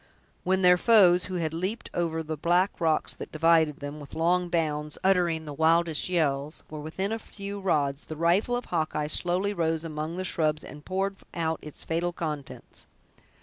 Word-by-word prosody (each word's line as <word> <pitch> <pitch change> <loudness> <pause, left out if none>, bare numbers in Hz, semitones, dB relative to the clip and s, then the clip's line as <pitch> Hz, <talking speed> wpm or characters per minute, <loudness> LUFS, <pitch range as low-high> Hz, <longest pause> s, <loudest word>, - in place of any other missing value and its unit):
When 190 +1 +1
their 180 0 +7
foes, 185 -6 +5
who 185 - -5
had 160 -3 -1
leaped 190 +8 -3
over 160 -2 -1
the 155 0 -4
black 175 +5 +1
rocks 160 -2 +2
that - - -9
divided 160 -2 +3
them, 145 +1 -6
with 145 0 -11
long 175 +2 +1
bounds, 150 -3 0
uttering 175 -4 +2
the 150 - -6
wildest 160 +2 +2
yells, 150 -4 -1
were 155 - -6
within 180 +7 -3
a 225 - -2
few 200 -1 -7
rods, 145 -7 0
the 155 - -7
rifle 175 +9 +2
of 245 - -3
Hawkeye 155 -3 -1
slowly 180 +6 +1
rose 165 -3 0
among 155 +1 -4
the 185 +1 -3
shrubs, 155 -4 0
and 150 0 -11
poured 195 +2 -2 0.2
out 160 -2 -1
its 150 - -8
fatal 170 +2 -1
contents. 150 -5 -6
165 Hz, 180 wpm, -27 LUFS, 155-180 Hz, 0.2 s, their